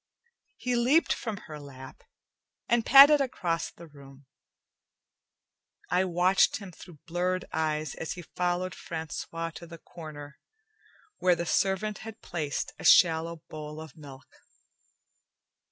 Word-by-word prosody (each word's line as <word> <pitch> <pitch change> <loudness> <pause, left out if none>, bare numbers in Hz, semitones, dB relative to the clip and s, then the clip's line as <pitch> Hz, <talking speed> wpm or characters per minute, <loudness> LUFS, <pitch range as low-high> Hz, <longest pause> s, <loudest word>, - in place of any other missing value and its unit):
He 250 -1 -1
leaped 255 +8 +3
from 220 -4 -5
her 155 -2 -9
lap 130 -2 -12 0.7
and 235 -1 +2
padded 280 +2 +9
across 175 -11 -2
the 170 - -14
room. 140 -2 -16 1.7
I 180 +2 +3
watched 180 +2 +3
him 195 -3 -10
through 170 -1 -14
blurred 180 +2 -1
eyes 155 -2 -1
as 160 - -5
he 175 - -9
followed 180 +2 -2
Francois 165 +1 -5
to 170 +1 -11
the 165 0 -10
corner, 150 -4 -11 0.8
where 180 -1 +4
the 170 - -3
servant 195 +4 0
had 225 0 -9
placed 155 -5 -3
a - - -9
shallow 165 -1 +4
bowl 150 0 -8
of 160 0 -10
milk. 140 -4 -14
170 Hz, 125 wpm, -28 LUFS, 155-185 Hz, 1.7 s, padded